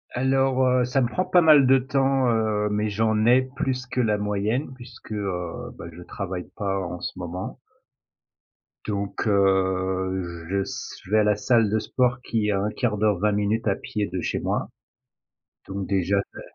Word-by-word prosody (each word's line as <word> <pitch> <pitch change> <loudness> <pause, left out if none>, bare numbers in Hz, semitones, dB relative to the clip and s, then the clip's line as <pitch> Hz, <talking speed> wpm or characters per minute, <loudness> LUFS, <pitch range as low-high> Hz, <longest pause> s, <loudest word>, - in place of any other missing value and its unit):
Alors, 130 +1 +2
heu, 125 -1 +3
ça 135 +2 +1
me 120 - +2
prend 185 +9 -1
pas 180 - +4
mal 155 -4 +7
de 135 - +6
temps, 135 0 +1
heu, 110 -2 +1
mais 105 +1 0
j'en 110 +1 +1
ai 125 +2 +6
plus 130 -1 -3
que 125 - -1
la 105 -3 +1
moyenne 105 +7 -1
puisque, 120 -3 -13
heu, 90 -5 -4
bah, - - -8
je 90 - -10
travaille 95 -1 -6
pas 95 -1 -1
en 90 0 -6
ce - - -4
moment 90 +7 -6 1.3
donc 100 0 -3
heu, 95 -3 0
je 100 0 +1
s - - -7
je 95 - -13
vais 110 - +5
à 105 - +4
la 105 -1 +3
salle 115 +1 +2
de 110 +1 +1
sport 125 +2 0
qui 110 -4 -1
est - - +2
à 100 -1 0
1/4 105 +1 -1
d'heure, 105 -3 +2
20 105 +2 +2
minutes 105 +2 0
à 100 - +2
pied 105 +1 -3
de 90 - -3
chez - - -2
moi. - - -2 1.0
Donc 95 0 -4
déjà, 100 0 +1 0.2
heu, - - -8
105 Hz, 190 wpm, -24 LUFS, 95-125 Hz, 1.3 s, mal